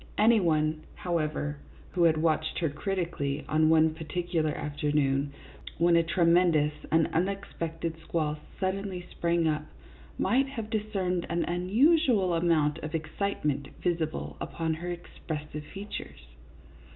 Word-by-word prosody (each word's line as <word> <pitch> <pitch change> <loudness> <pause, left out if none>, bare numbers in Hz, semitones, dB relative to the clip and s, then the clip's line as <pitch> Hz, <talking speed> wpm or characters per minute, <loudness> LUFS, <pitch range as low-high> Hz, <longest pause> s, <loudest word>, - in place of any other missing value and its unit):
Any 225 +2 +6
one, 155 -3 +1
however, 155 -4 -1 0.3
who 175 -2 +3
had 160 -1 +4
watched 155 0 +1
her 165 -4 0
criti 185 +3 -1
cally 140 -1 -3
on 155 +1 +3
one 160 0 +5
particular 165 0 -1
afternoon, 145 -2 0 0.5
when 170 +1 +4
a 170 - +6
tremen 170 +1 +4
dous 150 -1 +3 0.2
and 160 0 +4
unexpected 165 -2 -2
squall 155 -2 -1 0.2
suddenly 190 -1 -2
sprang 170 -1 +1
up, 155 -1 0 0.5
might 265 +3 +2
have 225 -5 -6
discerned 195 -5 -1
an 170 +1 +1
unusual 210 - +3
amount 165 -3 +2
of 155 +2 -4
excite 165 +4 -3
ment 140 -1 0
visible 155 - -2
upon 165 -1 -2
her 170 +3 -5
expressive 150 -3 -6
features. 195 - -8
165 Hz, 130 wpm, -29 LUFS, 155-180 Hz, 0.5 s, Any